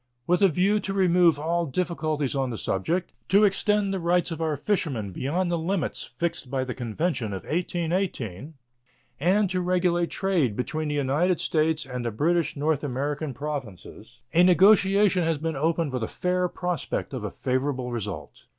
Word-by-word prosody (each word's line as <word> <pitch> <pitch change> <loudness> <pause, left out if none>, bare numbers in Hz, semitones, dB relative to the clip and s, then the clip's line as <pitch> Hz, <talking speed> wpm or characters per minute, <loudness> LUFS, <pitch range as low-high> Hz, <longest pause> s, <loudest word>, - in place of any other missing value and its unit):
With 180 +5 +2
a 195 - +7
view 190 +5 +2
to 195 0 -4
remove 175 -4 +4
all 170 +2 0
difficulties 155 -3 -1
on 135 -2 0
the 115 - -4
subject, 160 - -1 0.2
to 200 +3 +5
extend 205 0 +2
the 190 - -1
rights 175 +1 +1
of 165 - -4
our 155 -2 0
fishermen 135 - -1
beyond 175 - -1
the 170 - 0
limits 175 +2 -2
fixed 170 -6 -2
by 130 0 -1
the 130 -1 -4
convention 120 - -2
of 95 - -5
1818, 165 - -2 0.6
and 195 +7 +3
to 185 -1 0
regulate 175 -1 +1
trade 170 - 0
between 155 +6 -2
the 150 - -2
United 150 +6 +1
States 155 -1 +1
and 125 -2 -5
the 120 - -1
British 160 +7 0
North 150 0 0
American 145 +2 -2
Provinces, 120 - -7 0.2
a 170 - +5
negotiation 195 +1 +5
has 165 -1 +1
been 160 +1 -3
opened 160 0 0
with 125 - -2
a 110 - -1
fair 180 0 0
prospect 180 -5 -3
of 125 -5 -4
a 105 - -2
favorable 130 0 -2
result. 105 -4 -6
160 Hz, 170 wpm, -26 LUFS, 135-180 Hz, 0.6 s, a